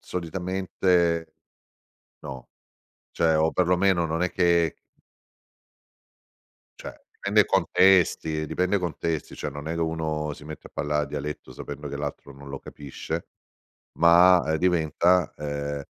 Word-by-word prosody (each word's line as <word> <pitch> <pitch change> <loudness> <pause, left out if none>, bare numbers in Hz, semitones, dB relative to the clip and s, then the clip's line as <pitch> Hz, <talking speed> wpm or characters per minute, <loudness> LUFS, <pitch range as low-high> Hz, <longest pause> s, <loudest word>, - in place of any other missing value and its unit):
solitamente 90 -1 0 1.0
no, 65 -4 -9 0.6
cioè 80 -1 +2
o 80 +1 +2
perlomeno 90 0 +2
non 80 +2 -2
è 90 - 0
che 85 -2 +2 2.0
Cioè, - - -8 0.2
dipende - - +1
i - - +5
contesti 85 -4 +3
dipende 90 +5 0
i - - +1
contesti, 85 -3 -3
cioè 75 - -5
non 75 +1 -8
è 80 - -2
che 85 - -3
uno 80 -2 -2
si 75 - -11
mette 75 -1 -9
a - - -33
parlare 75 0 -1
dialetto 75 -1 -6
sapendo 75 +3 -7
che 70 - -5
l'altro 70 -1 -6
non 70 +1 -12
lo 70 - -6
capisce. 70 -2 -6 0.7
Ma, 85 +2 +6
ehm, 80 - +1
diventa, 90 0 +2
ehm 75 -1 -4
80 Hz, 130 wpm, -25 LUFS, 75-90 Hz, 2.0 s, Ma